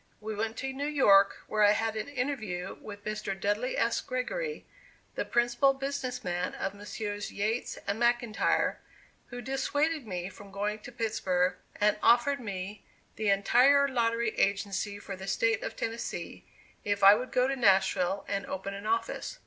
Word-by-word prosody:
We 220 0 -5
went 220 +2 -3
to 265 0 -3
New 280 +2 -3
York 200 -10 +4
where 215 - -1
I 205 0 +7
had 225 +1 -1
an 220 - -3
interview 245 -10 -3
with 205 -1 -10
Mr. 215 -2 -3
Dudley 210 +6 -1
S. 230 0 +1
Gregory, 455 - -3 0.5
the - - -2
principal 240 +3 +2
business 270 -2 -4
man 180 -1 -2
of 195 - -3
Messrs. 205 0 -5
Yates 220 +4 -2
and 200 +3 -2
McIntyre, 240 -2 +2 0.5
who 245 0 -8
dissuaded 285 +2 0
me 180 -2 -3
from 195 +1 -12
going 205 +2 -2
to 245 - -10
Pittsburg, 190 -6 0 0.2
and 210 0 +3
offered 245 +4 +4
me 200 -3 -6 0.3
the 215 -1 0
entire 255 +8 +5
lottery 235 -3 0
agency 200 0 0
for 200 -1 -7
the 190 +1 -9
State 225 +3 +1
of - - -5
Tennessee, 230 +1 -5 0.4
if 205 -1 -1
I 200 +1 +10
would 245 +4 -2
go 250 0 +3
to 270 - 0
Nashville 195 -4 +2
and 200 0 -2
open 190 +1 -4
an 200 +2 -6
office. 230 - -2
220 Hz, 165 wpm, -29 LUFS, 200-250 Hz, 0.5 s, I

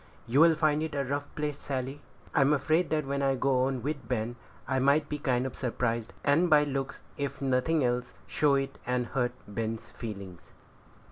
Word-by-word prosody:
"You'll 160 +7 +5
find 155 -1 +2
it 160 -1 -3
a 140 - +1
rough 145 +2 -2
place, 150 -1 -2
Sally." 135 +1 -4 0.3
"I'm 140 +1 +4
afraid 155 +5 +2
that 155 -2 0
when 140 +1 -1
I 135 -1 +2
go 130 -1 +2
on 130 -2 -2
with 145 0 -3
Ben 120 -1 -1 0.3
I 135 - +1
might 140 +3 +3
be 150 - -3
kind 130 -3 +1
of 130 - -4
surprised, 115 -2 -1
and 165 +5 +3
by 150 -2 +6
looks, 135 -2 -3
if 140 -1 -3
nothing 135 +3 +2
else, 125 0 -1
show 145 -2 +2
it, 135 0 -2
and 125 0 +1
hurt 125 -1 -1
Ben's 110 +2 -4
feelings." 100 -6 -8
135 Hz, 185 wpm, -29 LUFS, 125-150 Hz, 0.3 s, by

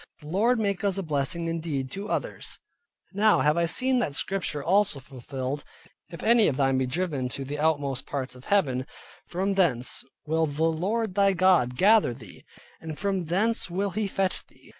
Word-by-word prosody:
The 150 - -10
Lord 225 +8 +2
make 200 -2 -1
us 200 -1 +1
a 195 - -2
blessing 155 +2 -1
indeed, 160 -5 -2
each - - -10
to 200 +2 -5
others. - - -3 0.6
Now 215 +2 +4
have 150 +1 +3
I 170 0 +1
seen 255 +8 +2
that 150 -12 -1
Scripture 175 -5 -1
also 190 -3 +2
fulfilled, 130 +1 -5 0.5
"If 170 - -9
any 230 -1 +5
of 135 - 0
thine 135 -2 +2
be 130 - 0
driven 145 -2 -2
out 125 - -4
to 135 - -4
the 145 +2 -5
outmost 145 -4 0
parts 135 -3 -4
of 125 0 -14
heaven, 130 -11 +1 0.4
from 190 +3 -1
thence 135 -11 +1 0.2
will 160 +1 +1
the 150 +2 -2
Lord 190 +7 0
thy 200 0 +3
God 175 -9 +3
gather 200 - +4
thee, 110 -7 -13 0.4
and 160 -2 -7
from 195 -3 -1
thence 200 +6 0
will 195 +3 -1
he 210 +3 -1
fetch 190 -1 -1
thee. - - -21
165 Hz, 190 wpm, -26 LUFS, 140-195 Hz, 0.6 s, any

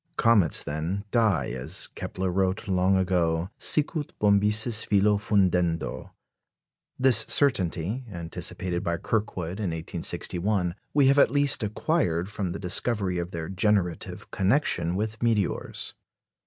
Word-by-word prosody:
Comets, 105 -8 +3
then, 80 +7 -3
die, 105 - +1
as 60 0 -1
Kepler 95 0 -4
wrote 95 +3 -1
long 95 0 +2
ago, 90 -1 0
sicut 150 0 +1
bombyces 105 +2 +3
filo 105 0 +2
fundendo. 90 -5 0 0.9
This 130 -1 +5
certainty, 105 - +1
anticipated 85 +1 -3
by 85 -2 -1
Kirkwood 100 -2 -3
in 100 -4 -1
1861, 90 +3 -1 0.2
we 145 -2 +5
have 140 +2 +4
at - - +5
least 145 -2 +2
acquired 105 - -1
from 100 -4 -3
the 85 - -4
discovery 95 -1 0
of 85 0 -4
their 80 -3 -5
generative 95 -3 -1
connection 95 - +1
with 110 +2 -3
meteors. 110 -5 -1
95 Hz, 120 wpm, -26 LUFS, 85-110 Hz, 0.9 s, This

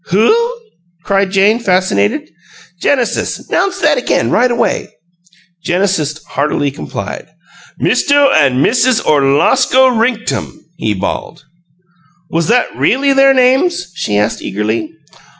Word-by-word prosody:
"WHO?" 440 - +2 0.5
cried 195 0 0
Jane, 200 +4 +2
fascinated. 180 - 0 0.5
"Genesis, 255 -5 -1
'nounce 385 0 0
that - - +2
again, - - -1
right 250 - +2
away!" 240 - -1 0.7
Genesis 170 -5 -1
heartily 145 0 -1
complied. 140 - -7 0.5
"Misto 285 -1 +2
an' 135 - +2
Missuz 250 0 +2
Orlosko 150 - +3
Rinktum!" 230 -1 -2 0.2
he 110 -8 -2
bawled. 100 +8 -5 0.9
"Was 165 0 -1
that 245 +3 +1
really 275 +2 +1
their 270 0 +4
names?" 260 - +1
she 105 -10 -2
asked, 105 0 -1
eagerly. 110 +2 -3
200 Hz, 110 wpm, -14 LUFS, -, 0.9 s, their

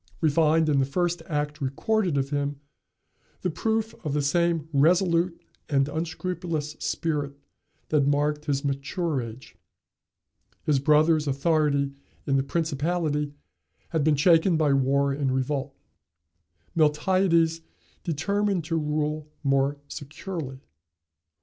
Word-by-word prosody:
We 160 -2 +2
find, 160 +1 +3
in 145 -2 +3
the 135 - +3
first 175 +4 -1
act 150 0 -2
recorded 175 +5 0
of 135 +1 -1
him, 145 -1 -1 0.8
the 180 - -1
proof 220 +5 -1
of 150 -4 -2
the 150 - +1
same 165 +1 +1
resolute 170 +3 +3 0.3
and 135 -2 +2
unscrupulous 160 0 -3
spirit 145 -4 -2 0.5
that 145 -3 +3
marked 150 +1 +1
his 140 -1 -1
mature 140 +2 -1
age. 115 +2 -10 1.1
His 145 -3 +2
brother's 155 +2 +3
authority 140 -1 +1 0.3
in 135 - +1
the 135 - +3
principality 150 0 -1 0.5
had 160 -3 0
been 155 0 +4
shaken 165 +3 +4
by 150 -3 +3
war 140 +1 +2
and 135 -1 -1
revolt: 135 +1 -1 1.0
Miltiades 165 +1 +3 0.4
determined 195 +3 0
to 165 +2 -1
rule 150 0 -1 0.2
more 135 +1 +2
securely. 145 -2 -6
150 Hz, 120 wpm, -26 LUFS, 140-165 Hz, 1.1 s, been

